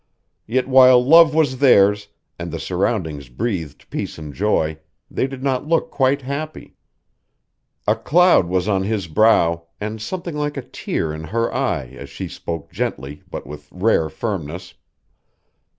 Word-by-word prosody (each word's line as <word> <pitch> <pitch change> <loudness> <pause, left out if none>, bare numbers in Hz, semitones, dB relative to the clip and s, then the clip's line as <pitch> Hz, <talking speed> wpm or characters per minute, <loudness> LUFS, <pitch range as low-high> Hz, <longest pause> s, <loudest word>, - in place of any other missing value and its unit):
Yet 130 +4 0
while 130 -1 +6
love 160 +1 +7
was 140 -5 +1
theirs 105 -6 +4 0.3
and 85 0 -5
the - - -4
surroundings 90 - -2
breathed 85 - -4
peace - - -4
and 75 -2 -8
joy, 80 -6 0 0.3
they 130 - 0
did 135 -1 -8
not 135 +1 -1
look 165 0 +1
quite 135 0 +1
happy. 145 +4 -6 1.1
A - - +4
cloud 175 - +4
was 90 +1 0
on 100 -2 +1
his 100 -2 -2
brow 85 -2 +3
and 110 +1 -5
something 175 +6 -5
like 150 -1 -2
a 135 - -4
tear 80 -8 -3
in 80 +1 -7
her 115 +7 -1
eye 65 - -1
as 70 - -9
she - - -6
spoke 80 -3 -6
gently 70 +2 -4
but - - -6
with 75 +2 -10
rare 90 -4 +1
firmness. 90 -6 -5
105 Hz, 150 wpm, -20 LUFS, 80-130 Hz, 1.1 s, love